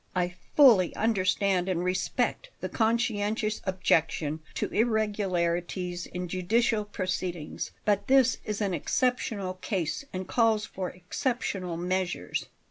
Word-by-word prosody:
I 180 -1 0 0.2
fully 230 - +6
understand 195 -3 +1
and 175 -2 0
respect 185 - -1
the - - -4
conscientious 220 -2 0
objection 160 -5 +1 0.2
to - - -1
irregularities 185 -5 0
in 180 0 -5
judicial 210 +5 +1
proceedings; 185 -5 -3 0.2
but 205 -1 +1
this 260 -2 +4
is 210 0 -3
an 200 -3 0
exceptional 205 - 0
case 185 - -2
and 185 0 -5
calls 220 -1 +2
for 185 -1 -4
exceptional 180 -2 -3
measures." 180 - -2
190 Hz, 115 wpm, -28 LUFS, 180-220 Hz, 0.2 s, fully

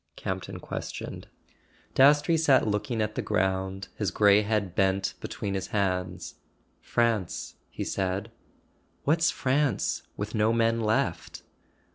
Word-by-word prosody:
Campton - - -5
questioned. - - -6 0.7
Dastrey 145 +4 +5
sat 155 -5 +4
looking 110 +2 0
at 105 0 -3
the - - -2
ground, 95 -1 -1
his 105 -4 +1
grey 105 +2 +5
head 105 -4 -1
bent 95 +1 +1
between 100 - -4
his 95 -1 -3
hands. 95 -3 -2 0.4
"France," 115 -6 0 0.2
he - - -5
said. 95 +3 -2 0.7
"What's 160 +3 +3
France, 135 -3 0 0.2
with 105 +1 -4
no 110 0 +2
men 115 0 +2
left?" 110 0 -1
105 Hz, 120 wpm, -27 LUFS, 95-115 Hz, 0.7 s, Dastrey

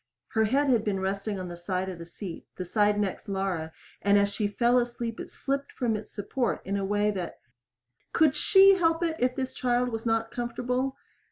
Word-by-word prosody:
Her 220 0 +2
head 275 +5 +2
had 230 -4 +3
been 200 -3 -1
resting 195 +1 -2
on 185 - -4
the 175 - -6
side 185 +2 -2
of 185 -2 -6
the 170 - -8
seat 175 0 -8
the 185 - -5
side 205 +2 +2
next 200 -1 -2
Laura 190 -5 -2 0.3
and 200 0 +4
as 200 0 +3
she 205 0 0
fell 240 +4 +3
asleep 240 -1 -3
it - - -6
slipped 275 0 -3
from 235 -3 0
its 215 0 -7
support 235 +4 -1
in 200 - -1
a 200 - -1
way 205 +1 +1
that 185 -4 -5 0.7
Could 310 -3 +4
she 390 +3 +7
help 330 0 +2
it 330 -1 0
if 250 0 +1
this 260 -1 -3
child 245 0 +1
was 225 0 -4
not 225 0 +1
comfortable? 250 +2 -2
220 Hz, 205 wpm, -28 LUFS, 195-250 Hz, 0.7 s, she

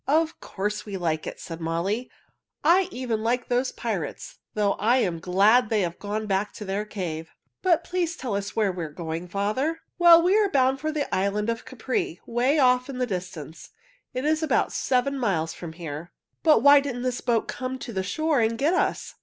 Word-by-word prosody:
"Of 320 +3 +2
course 210 +2 -3
we 200 -2 -5
like 160 -3 -1
it," - - -6
said 165 -1 -7
Molly. 175 +9 -1 0.5
"I 350 +4 +5
even 245 -7 -3
like 240 +2 0
those 250 +1 +1
pirates, 200 -10 -5 0.2
though 205 -2 +2
I 235 +5 +3
am 180 -9 0
glad 205 +7 +4
they 220 -2 +2
have 170 -2 -3
gone 210 +1 -3
back 200 0 -1
to 210 - -8
their 200 +2 -2
cave. 165 -6 -5 0.3
But 345 -3 +3
please 350 -1 -1
tell 240 -6 -3
us 200 -1 -4
where 210 -3 +2
we 180 -2 -5
are 160 - -5
going, 165 +2 -5
father." 215 - -1 0.2
"Well, 340 -1 +8
we 365 +3 +4
are 415 -2 +3
bound 265 -3 +2
for 310 +2 -2
the 300 -2 -3
island 205 +3 +1
of 230 - -6
Capri, 370 -5 -3
away 250 +6 +2
off 250 -1 +3
in 265 - -5
the 250 - +1
distance. 180 - -6 0.5
It 255 +2 -2
is 310 +1 +2
about 315 - +1
seven 270 +2 0
miles 165 -9 0
from 165 -2 -8
here." 165 0 -7 0.3
"But 315 -2 +5
why 285 0 +9
didn't 260 -3 -4
this 250 -1 -1
boat 235 -2 +1
come 255 +1 -4
to 245 -2 -7
the 190 - -1
shore 310 - 0
and 225 0 +1
get 295 +8 +2
us?" - - 0
230 Hz, 205 wpm, -25 LUFS, 190-275 Hz, 0.5 s, why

